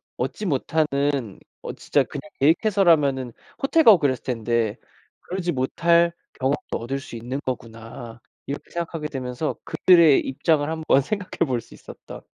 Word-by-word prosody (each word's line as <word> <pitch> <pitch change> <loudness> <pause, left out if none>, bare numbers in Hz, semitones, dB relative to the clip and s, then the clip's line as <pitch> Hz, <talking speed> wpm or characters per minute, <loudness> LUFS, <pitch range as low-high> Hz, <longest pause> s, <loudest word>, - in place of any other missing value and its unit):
얻지 210 - -4
못하는 140 - 0 0.3
어 - - -5
진짜 145 - +1
그냥 145 +3 -9
계획해서라면은 155 - +3 0.3
호텔 320 +4 +3
가고 215 - +8
그랬을 135 -4 0
텐데 115 -2 -1 0.4
그러지 180 -1 -3
못할 170 +5 +2 0.3
경험도 135 +2 -1
얻을 135 +4 -3
수 120 - -9
있는 125 +5 -5
거구나.' 115 -1 -7 0.3
이렇게 140 - -6
생각하게 165 -3 -4
되면서 130 +2 -4
그들의 170 -6 +5
입장을 145 +2 0
한번 160 -4 +2
생각해 185 +2 -2
볼 125 -5 -1
수 - - -15
있었던 - - -12
140 Hz, 330 characters per minute, -23 LUFS, 125-170 Hz, 0.4 s, 가고